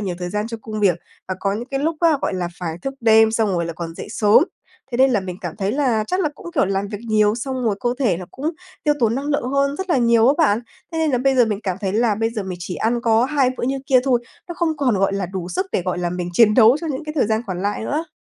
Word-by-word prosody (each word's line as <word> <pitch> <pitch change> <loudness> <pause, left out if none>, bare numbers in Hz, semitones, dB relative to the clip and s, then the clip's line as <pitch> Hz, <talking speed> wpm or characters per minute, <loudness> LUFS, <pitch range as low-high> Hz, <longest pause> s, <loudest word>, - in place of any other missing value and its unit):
nhiều 190 -4 -3
thời 180 -1 -4
gian 210 +2 -2
cho 230 0 -5
công 215 -1 -5
việc, 185 -5 +3 0.3
và 185 - -1
có 195 - 0
những 225 +4 -4
cái 270 0 -2
lúc 320 +2 0
á, 330 -4 +4
gọi - - -1
là, 180 -2 -2
phải 170 -2 -4
thức 270 - -4
đêm 220 -1 +5
xong 220 -1 +1
rồi 175 -3 0
là 170 - -4
còn 165 0 -6
dậy - - -7
sớm, 220 +7 +4 0.5
thế - - 0
nên 265 +1 +5
là 220 -5 +2
mình 185 -2 -6
cảm 175 -5 -6
thấy 200 0 -1
là 250 -6 +1
chắc 365 - -1
là 310 - +1
cũng, - - -13
kiểu, 285 - +3
làm 195 +1 -1
việc 205 - -5
nhiều 215 -1 +3
xong 255 +1 -3
rồi 215 -3 +1
cơ 245 - 0
thể 230 -11 +2
nó 180 - -7
cũng 290 +5 -3 0.3
tiêu 295 -1 +3
tốn 230 -1 +2
năng 275 +3 -3
lượng 285 -4 -1
hơn 280 +1 +1
rất 380 -1 -5
là 335 - +4
nhiều 235 -1 +4
á 280 - +4
bạn. 230 -10 +3 0.3
Thế 325 - -2
nên 320 -1 +1
là 250 - +1
bây 270 +2 +2
giờ 245 - +6
mình 210 -2 -2
cảm 185 -4 -2
thấy 195 -2 -2
là 220 0 +2
bây 225 +2 -1
giờ 225 -3 -4
mình 185 -2 -6
chỉ 180 - -5
ăn 235 +5 0
có 230 0 +3
hai 270 -2 +2
bữa - - -3
như 270 +2 -1
kia 260 -1 +5
thôi, 250 -3 +2 0.3
nó 345 - -5
không 330 -2 -1
còn, 255 -8 +1
gọi 195 0 +2
là, 195 -2 -2
đủ 180 -1 -5
sức 370 - -2
để, - - 0
gọi 180 0 -2
là, 175 -1 -1
mình 180 0 -3
chiến 215 +3 +5
đấu 235 +2 +6
cho 335 - -4
những 295 0 -4
cái 305 - -5
thời 265 - +3
gian 220 +1 +1
còn 185 -2 -4
lại 205 +2 -2
nữa. 310 +6 -2
225 Hz, 310 wpm, -21 LUFS, 195-270 Hz, 0.5 s, giờ